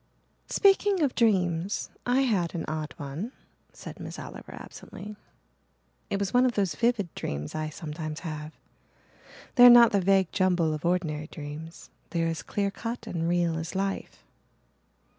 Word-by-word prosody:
"Speaking 395 -2 +4
of 275 - +1
dreams 190 -5 +1 0.2
I 250 +2 +3
had 195 -11 +1
an 165 - -3
odd 155 -1 -4
one," 150 - -5 0.4
said - - -10
Miss - - -7
Oliver - - -9
absently. 210 +1 -10 0.9
"It 200 - 0
was 195 -1 -2
one 250 +1 +5
of 255 -2 +2
those 195 -5 0
vivid 230 -7 0
dreams 75 +1 -4
I 155 0 -2
sometimes 155 0 -6
have 155 -2 -5 1.1
they 245 - +10
are - - +11
not 240 -1 +9
the 200 - +2
vague 190 -1 +3
jumble 180 -5 +2
of 155 +2 -5
ordinary 160 -4 0
dreams 155 +2 -9 0.2
they 170 -1 0
are - - +1
as 165 -2 -3
clear 200 +4 -1
cut 230 +3 -5
and 170 -6 -2
real 170 -2 +1
as 165 +3 -6
life." 195 0 -3
180 Hz, 160 wpm, -28 LUFS, 160-215 Hz, 1.1 s, are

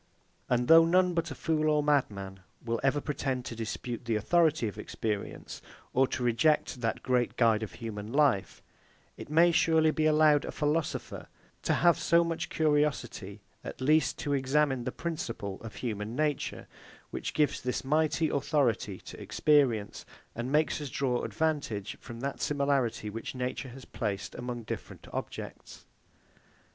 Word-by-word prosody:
And 125 0 +1
though 165 0 +9
none 180 +2 +3
but 165 -1 -1
a - - -6
fool 155 -1 0
or 150 -1 +2
madman 100 -10 0 0.3
will 115 0 -1
ever 135 +2 +2
pretend 135 -4 -2
to 115 - -5
dispute 115 +2 -5
the 115 -1 0
authority 155 +3 +2
of 105 0 -7
experience, 105 -1 -4 0.3
or 135 +1 +4
to 130 - -3
reject 120 +2 +2
that 115 -1 -2
great 125 -1 +1
guide 115 -3 +4
of 110 -4 -5
human 110 -2 -6
life, 140 -8 +1 0.5
it - - -10
may 165 +3 +5
surely 160 -1 +4
be 155 0 +1
allowed 155 -1 +5
a - - -5
philosopher 150 +1 -2 0.3
to - - +1
have 170 -1 +4
so 170 0 +4
much 165 0 -3
curiosity 145 -10 0 0.2
at - - -7
least 150 +2 +3
as - - -5
to 145 - 0
examine 135 -1 +1
the - - -2
principle 115 - -5
of 110 -3 -9
human 110 -1 -4
nature, 150 -1 -1 0.4
which - - -4
gives 150 -2 +1
this 125 0 -2
mighty 155 +3 +2
authority 130 - 0
to - - -10
experience, 130 -9 +2 0.3
and 120 +3 -4
makes 155 +1 +2
us 145 - -4
draw 125 -1 0
advantage 145 -11 -2
from 115 0 -9
that 140 +1 -4
similarity 135 -7 0
which 115 +4 -6
nature 130 +1 -3
has 130 +1 -11
placed 105 -3 -4
among 120 -1 -5
different - - -7
objects. - - -7
135 Hz, 155 wpm, -30 LUFS, 115-155 Hz, 0.5 s, though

